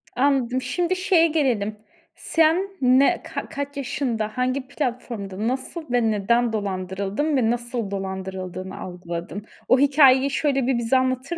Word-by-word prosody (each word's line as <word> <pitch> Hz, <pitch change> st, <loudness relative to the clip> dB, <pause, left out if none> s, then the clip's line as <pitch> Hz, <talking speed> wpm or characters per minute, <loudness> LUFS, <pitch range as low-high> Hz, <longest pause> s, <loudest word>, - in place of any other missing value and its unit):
Anladım. 260 Hz, -2 st, +1 dB
Şimdi 345 Hz, +8 st, -1 dB
şeye 365 Hz, -3 st, +3 dB
gelelim, 245 Hz, -10 st, 0 dB, 0.4 s
sen 330 Hz, +4 st, +2 dB
ne 255 Hz, +2 st, +4 dB
ka -, -, -6 dB
kaç 285 Hz, +1 st, -5 dB
yaşında, 245 Hz, -5 st, -2 dB
hangi 255 Hz, +1 st, -1 dB
platformda, 235 Hz, -7 st, -4 dB
nasıl 260 Hz, +7 st, -3 dB
ve 240 Hz, -2 st, +2 dB
neden 230 Hz, +3 st, +1 dB
dolandırıldın? 200 Hz, -, -2 dB
Ve 230 Hz, -4 st, +2 dB
nasıl 235 Hz, -3 st, -2 dB
dolandırıldığını 190 Hz, -1 st, -5 dB
algıladın? 175 Hz, +2 st, -6 dB, 0.2 s
O 255 Hz, -, +5 dB
hikâyeyi 275 Hz, -1 st, +5 dB
şöyle 275 Hz, -2 st, 0 dB
bir 260 Hz, -2 st, +2 dB
bize 235 Hz, +2 st, +2 dB
anlatır 260 Hz, +5 st, -1 dB
250 Hz, 130 wpm, -23 LUFS, 205-275 Hz, 0.4 s, O